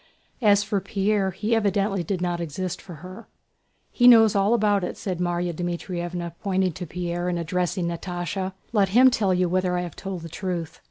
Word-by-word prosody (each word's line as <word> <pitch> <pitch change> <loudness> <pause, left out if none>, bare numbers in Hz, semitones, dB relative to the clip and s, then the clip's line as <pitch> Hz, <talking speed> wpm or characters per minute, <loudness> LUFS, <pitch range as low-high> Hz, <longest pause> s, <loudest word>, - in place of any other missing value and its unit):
As 205 -2 +5
for 200 -1 -1
Pierre, 200 0 0
he 210 +5 -2
evidently 200 -2 +1
did 180 +1 -3
not 175 -1 -1
exist 175 +3 -4
for 180 -3 -10
her. 185 +5 -10 0.6
"He 245 - +4
knows 225 -4 +7
all 200 +4 +3
about 205 -3 +2
it," - - -4
said 185 -3 -4
Márya 175 0 -1
Dmítrievna 175 0 -4
pointing 190 -2 +1
to 180 +2 -7
Pierre 175 +1 -3
and 175 - -1
addressing 180 +1 -1
Natásha. 175 +2 -3 0.2
"Let 200 -3 +3
him 255 +6 +6
tell 210 -6 +1
you 180 0 +2
whether 180 0 0
I - - 0
have 175 -3 -6
told 190 -3 -6
the - - -6
truth." 175 -2 -4
185 Hz, 185 wpm, -24 LUFS, 175-200 Hz, 0.6 s, knows